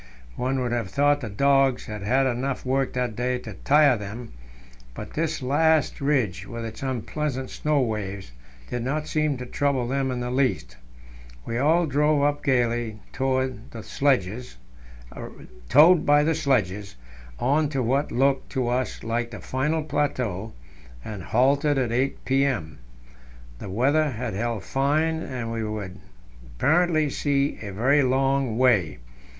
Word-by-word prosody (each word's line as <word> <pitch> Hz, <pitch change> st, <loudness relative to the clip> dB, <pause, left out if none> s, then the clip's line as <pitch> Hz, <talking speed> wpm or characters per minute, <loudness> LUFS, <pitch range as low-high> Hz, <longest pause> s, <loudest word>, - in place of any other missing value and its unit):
One 130 Hz, +1 st, -1 dB
would 125 Hz, -1 st, -2 dB
have 115 Hz, -5 st, -2 dB
thought 145 Hz, +5 st, +2 dB
the 115 Hz, -, -5 dB
dogs 135 Hz, +3 st, +2 dB
had 105 Hz, -1 st, -6 dB
had 130 Hz, +7 st, +2 dB
enough 130 Hz, +2 st, -2 dB
work 135 Hz, +1 st, 0 dB
that 125 Hz, -3 st, -2 dB
day 125 Hz, +2 st, -1 dB
to 115 Hz, -4 st, -8 dB
tire 145 Hz, +6 st, +4 dB
them, 110 Hz, +3 st, -7 dB, 0.6 s
but -, -, -8 dB
this 160 Hz, -3 st, -2 dB
last 155 Hz, +3 st, +2 dB
ridge, 110 Hz, -10 st, 0 dB
with 115 Hz, -1 st, -6 dB
its 110 Hz, -1 st, -8 dB
unpleasant 130 Hz, +1 st, -3 dB
snow 150 Hz, -1 st, 0 dB
waves, 100 Hz, -, -4 dB, 0.4 s
did 125 Hz, -, -3 dB
not 150 Hz, +4 st, -2 dB
seem 155 Hz, -3 st, 0 dB
to 125 Hz, -, -6 dB
trouble 135 Hz, -1 st, 0 dB
them 135 Hz, +1 st, -1 dB
in 125 Hz, -1 st, -2 dB
the 125 Hz, 0 st, -3 dB
least. 125 Hz, -, 0 dB, 0.7 s
We 115 Hz, +1 st, -2 dB
all 160 Hz, +5 st, +3 dB
drove 150 Hz, 0 st, +2 dB
up 145 Hz, 0 st, 0 dB
gaily, 120 Hz, -4 st, 0 dB, 0.2 s
towed 130 Hz, -1 st, -1 dB
by -, -, -10 dB
the 110 Hz, -, -7 dB
sledges, 120 Hz, -, -1 dB, 2.7 s
on 145 Hz, +4 st, +2 dB
to 135 Hz, -3 st, -1 dB
what 135 Hz, +5 st, 0 dB
looked 135 Hz, +2 st, +1 dB
to 125 Hz, -2 st, 0 dB
us 125 Hz, +1 st, -2 dB
like 115 Hz, +1 st, -2 dB
the 115 Hz, -, -8 dB
final 150 Hz, +5 st, -1 dB
plateau, 125 Hz, -9 st, -2 dB, 0.5 s
and 105 Hz, -3 st, -6 dB
halted 140 Hz, -, +2 dB
at 125 Hz, -3 st, 0 dB
8 130 Hz, +3 st, -1 dB
p.m. 135 Hz, -, 0 dB, 0.8 s
The -, -, -7 dB
weather 140 Hz, +9 st, +2 dB
had 120 Hz, -3 st, -4 dB
held 115 Hz, 0 st, -2 dB
fine, 155 Hz, +4 st, 0 dB
and 120 Hz, -5 st, -5 dB
we 115 Hz, -1 st, -3 dB
could 105 Hz, -4 st, -5 dB, 0.6 s
apparently 155 Hz, -, +2 dB
see 140 Hz, 0 st, 0 dB
a 100 Hz, -2 st, -6 dB
very 130 Hz, +9 st, +3 dB
long 135 Hz, -2 st, +1 dB
way. 120 Hz, -10 st, +3 dB
130 Hz, 145 wpm, -25 LUFS, 115-140 Hz, 2.7 s, tire